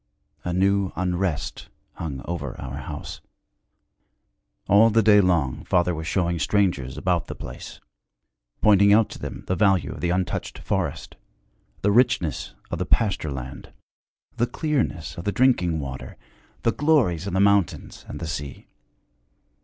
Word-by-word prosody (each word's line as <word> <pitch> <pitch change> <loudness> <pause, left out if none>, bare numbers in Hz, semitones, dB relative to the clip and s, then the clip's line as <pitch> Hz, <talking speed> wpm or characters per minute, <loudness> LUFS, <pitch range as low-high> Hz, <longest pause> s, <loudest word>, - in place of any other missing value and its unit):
A 90 - -2
new 95 +1 +2
unrest 90 -3 -2 0.2
hung 75 -6 -6
over 75 -7 -5
our 65 0 -6
house. 70 - -7 1.5
All 105 +3 +6
the 115 0 +3
day 105 -1 +7
long 85 -9 +1
father 90 0 +2
was 80 0 -5
showing 85 -2 0
strangers 75 -8 0
about 90 -2 0
the - - -6
place, - - -9 0.8
pointing 100 -1 +6
out 110 +1 +5
to - - -9
them - - -6
the 95 - 0
value 95 -2 +2
of - - -8
the 85 - 0
untouched 90 0 -2
forest, - - -3 0.7
the 100 - +3
richness 110 - +1 0.2
of - - -2
the - - -1
pasture 100 -8 +1
land, 65 -1 -7 0.6
the 120 - +2
clearness 120 - -2
of - - -6
the 100 - 0
drinking 95 -10 +2
water, 65 -2 -7 0.5
the 115 - +3
glories 115 - +2
of 100 - -4
the 95 - +1
mountains 100 -3 +1
and - - -7
the - - -4
sea. 75 -3 -6
90 Hz, 145 wpm, -24 LUFS, 80-100 Hz, 1.5 s, day